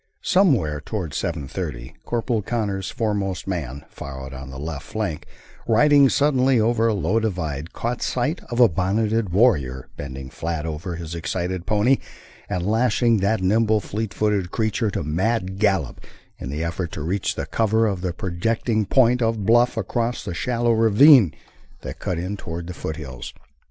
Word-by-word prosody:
Somewhere 120 - +2
toward 90 -5 -4
seven 80 -5 -3
thirty - - -5
Corporal 120 -1 -1
Connors' 100 -4 -2
foremost 100 -5 -2
man, 70 -7 -4
far 65 -1 -8
out 65 - -9
on 65 0 -8
the 65 - -8
left 75 0 -5
flank, 100 -8 -4 0.4
riding 140 +4 +5
suddenly 135 -3 +3
over 115 +1 +2
a 115 - +2
low 100 +4 +1
divide, 85 -8 -3
caught 120 +1 -3
sight 145 +7 -1
of 120 - -3
a 120 - +8
bonneted 105 +4 0
warrior 75 - +2
bending 65 -1 -7
flat 80 -1 -3
over 80 +2 -4
his 85 -1 -6
excited 90 +2 -3
pony 110 +5 +3 0.5
and 90 -1 -2
lashing 115 +1 +2
that 100 0 +1
nimble, 110 +3 +3
fleet 105 +1 -4
footed 100 -2 0
creature 110 +1 0
to - - -3
mad 95 +5 -1
gallop 95 - +1 0.4
in - - -6
the 75 +4 -3
effort 85 +1 -3
to 75 - -4
reach 90 +5 -1
the - - -3
cover 110 0 +1
of 100 -4 -1
the 90 -1 -1
projecting 110 +4 -1
point 125 +1 +4
of 115 -3 0
bluff 120 +3 +4
across 120 0 -2
the - - -4
shallow 120 +5 0
ravine 115 - +6 0.5
that - - -7
cut 90 - -2
in 90 +4 -3
toward 85 -3 -6
the 90 - -6
foothills. 70 -7 -7
100 Hz, 165 wpm, -23 LUFS, 85-115 Hz, 0.5 s, a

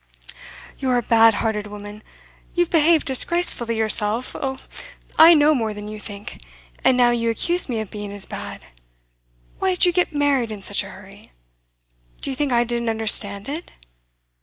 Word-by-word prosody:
'You're 255 -2 0
a 240 - -1
bad 225 -1 +4
hearted 210 -1 -2
woman! 205 0 -10 0.5
You've 350 -1 0
behaved 325 -1 +3
disgracefully 265 -4 +3
yourself 220 +2 +1
oh! 265 -1 -4 0.6
I 330 +1 +9
know 300 0 +4
more 220 -6 -2
than 210 0 -8
you 215 0 -8
think; 205 -1 -9 0.4
and 255 - +3
now 245 -1 +4
you 230 -1 -1
accuse 340 +9 0
me 235 -3 -2
of 215 - -9
being 205 -1 -7
as 200 -1 -8
bad. - - -8 1.0
Why 380 -1 0
did 360 - +3
you 355 - +3
get 355 -1 0
married 285 -6 0
in 205 -2 -8
such - - 0
a - - -10
hurry? - - -15 0.9
Do - - -4
you - - -5
think 285 0 -2
I 240 0 +3
didn't 235 -1 -3
understand 210 -2 +1
it? 305 +5 -6
235 Hz, 170 wpm, -21 LUFS, 215-290 Hz, 1.0 s, I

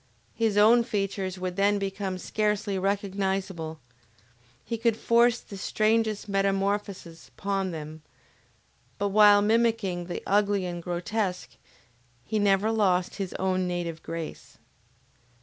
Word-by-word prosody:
His 220 -2 0
own 230 +3 +6
features 195 -4 -3
would 185 0 -4
then 200 +1 +3
become 195 -1 -3
scarcely 210 0 -1
recognizable, 190 -4 -2 0.9
he 230 - -3
could 230 -1 +1
force 235 +1 +3
the 200 - -11
strangest 215 +1 0
metamorphoses 195 -3 -1
upon 195 -1 -1
them, 155 -1 -7 1.0
but 200 0 0
while 205 0 +6
mimicking 220 -5 +1
the 175 - -5
ugly 200 -1 +2
and 175 -1 -5
grotesque, 180 +2 -3 0.7
he 215 +8 -1
never 205 +1 +3
lost 185 -5 +1
his 195 -3 -4
own 185 -1 0
native 175 -2 -3
grace. 165 -1 -7
195 Hz, 115 wpm, -27 LUFS, 185-210 Hz, 1.0 s, own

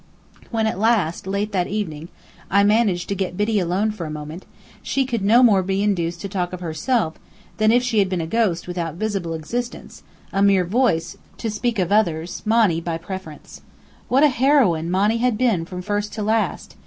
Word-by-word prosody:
When 225 -2 0
at 220 -4 -1
last, 205 -6 +1
late 200 +2 -2
that 185 -3 0
evening, 170 -6 -4 0.4
I 200 +1 +4
managed 205 -4 +2
to - - 0
get 185 -2 -3
Biddy 210 +1 +1
alone 190 +4 0
for 185 -6 -6
a - - -6
moment, 150 +3 -7 0.3
she 270 -1 0
could 235 -4 -2
no 225 +6 +5
more 205 -6 +5
be 195 +2 -1
induced 175 -4 -1
to 200 - -4
talk 185 -2 -3
of 180 - -5
herself 175 +2 -1 0.4
than 215 0 +4
if 245 +1 +3
she 235 -4 +1
had 195 -2 +2
been 185 -2 -1
a 165 - -2
ghost 185 -3 0
without 170 -3 -4
visible 190 -4 -2
existence, 240 +10 -5 0.3
a 195 - +1
mere 195 -2 +4
voice, 175 -5 0 0.2
to 225 - -3
speak 235 +2 -1
of 185 -1 0
others, 175 -5 +1
Monny 215 -7 +3
by 165 -1 -3
preference. 175 -3 -9 0.5
What 270 +4 +3
a 300 - +7
heroine 245 - +2
Monny 205 +5 +2
had 240 -2 +1
been 220 -9 +1
from 180 +1 -7
first 205 +1 -2
to 215 -1 -3
last! 220 +1 -1
200 Hz, 195 wpm, -21 LUFS, 175-220 Hz, 0.5 s, a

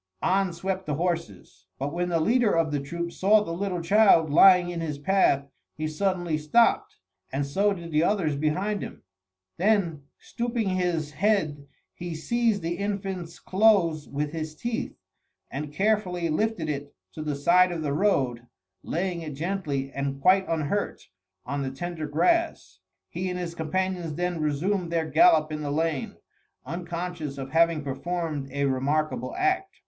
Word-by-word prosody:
On 195 0 +2
swept 190 +2 -4
the 150 - 0
horses; 145 - -4
but 140 +3 -3
when 175 +1 -1
the 170 -1 +1
leader 225 +2 +3
of 165 -2 +1
the 145 - 0
troop 170 +5 -4
saw 205 +4 +4
the 165 - -6
little 180 0 -2
child 170 -4 +5
lying 180 +2 +6
in 170 -1 -4
his 150 -3 -3
path, 145 -4 +2 0.3
he 155 +1 -3
suddenly 175 -1 -1
stopped, 230 +11 +2 0.4
and 140 +2 -1
so 195 +9 +1
did 170 -4 -6
the 155 0 +3
others 170 -6 +1
behind 185 +8 -1
him. - - -8 0.5
Then 180 -6 +1 0.2
stooping 235 -3 -2
his 175 -5 -1
head, 155 -4 0 0.3
he 175 -1 -6
seized 225 +3 0
the 170 +1 -2
infant's 195 -4 -4
clothes 185 -7 +2
with 145 +1 -2
his 155 -1 -5
teeth, 235 - -3 0.6
and 145 +1 -5
carefully 185 -2 0
lifted 200 0 0
it 145 -1 -4 0.2
to 155 - -7
the 150 -2 -2
side 180 +6 +4
of 165 -2 -3
the 145 -2 -1
road, 130 - +1 0.3
laying 175 0 -2
it 155 -3 -6
gently 150 -5 -2
and 140 0 -3
quite 185 +4 +4
unhurt 165 - -2 0.4
on 140 +2 -3
the 135 - -2
tender 160 +3 -5
grass. 335 - 0 0.3
He 185 +2 -4
and 180 - -3
his 175 -2 -4
companions 175 0 -2
then 175 -1 -2
resumed 170 +5 -1
their 165 -1 0
gallop 245 - +5
in 150 0 -4
the 145 - -3
lane, 155 -1 -1 0.5
unconscious 170 -2 -5
of 135 -1 -6
having 165 -1 +3
performed 150 0 -3
a 140 +1 0
remarkable 145 - -1
act. 380 +1 0
170 Hz, 160 wpm, -26 LUFS, 150-190 Hz, 0.6 s, lying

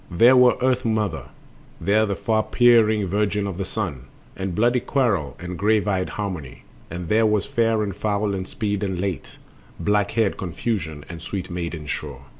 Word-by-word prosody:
There 115 +9 +6
was 125 -1 +6
Earth 130 -1 +2
mother, 110 -7 -1 0.5
There 110 +2 +2
the 100 - -1
far 110 +1 +1
peering 110 -3 +4
Virgin 105 +2 0
of 95 -2 -5
the 95 - -1
Sun, 90 - -4 0.3
And 95 -2 -4
bloody 120 +4 +3
Quarrel 115 - 0
and 90 -1 -6
grave 105 +1 +2
eyed 95 -2 0
Harmony, 90 -10 -5 0.3
And 85 +1 -6
there 110 +4 +3
was 105 -2 +1
Fair 115 -2 +1
and 100 -3 -4
Foul 105 -1 -1
and 95 -1 -4
Speed 105 -2 -2
and 95 -3 -2
Late, 95 -2 -4 0.4
Black 105 0 +1
haired 110 -3 +1
Confusion 85 -5 -3
and 85 -2 -8
sweet 90 +1 -5
maiden 85 -3 -4
Sure. - - -5
100 Hz, 175 wpm, -23 LUFS, 90-110 Hz, 0.5 s, There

